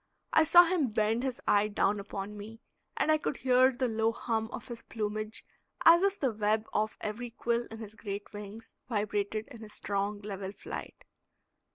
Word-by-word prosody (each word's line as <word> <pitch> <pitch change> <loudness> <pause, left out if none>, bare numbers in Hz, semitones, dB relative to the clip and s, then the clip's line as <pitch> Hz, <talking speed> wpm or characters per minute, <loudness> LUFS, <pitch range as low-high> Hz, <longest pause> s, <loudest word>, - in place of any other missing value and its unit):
I 315 - +6
saw 345 +2 +9
him 340 -5 +1
bend 220 +2 +1
his 260 -2 -2
eye 205 +1 +4
down 205 0 +1
upon 200 +1 -6
me, 215 +2 -9 0.4
and 310 - +3
I 310 - +4
could 290 - -2
hear 255 0 +5
the 255 0 -1
low 225 0 +1
hum 225 -1 -2
of - - -7
his 235 -1 -7
plumage, 215 0 -4 0.4
as 335 +1 +9
if 395 0 +1
the 265 -4 +1
web 215 +1 +1
off 215 +1 0
every 225 +3 -4
quill 235 0 -1
in 225 - -8
his 220 -2 -8
great 205 -2 -6
wings 210 +2 -9 0.2
vibrated 210 0 -1
in 245 -5 -11
his 215 -1 -9
strong, 200 +1 -1
level 195 -2 -5
flight. - - -8
220 Hz, 185 wpm, -31 LUFS, 210-245 Hz, 0.4 s, saw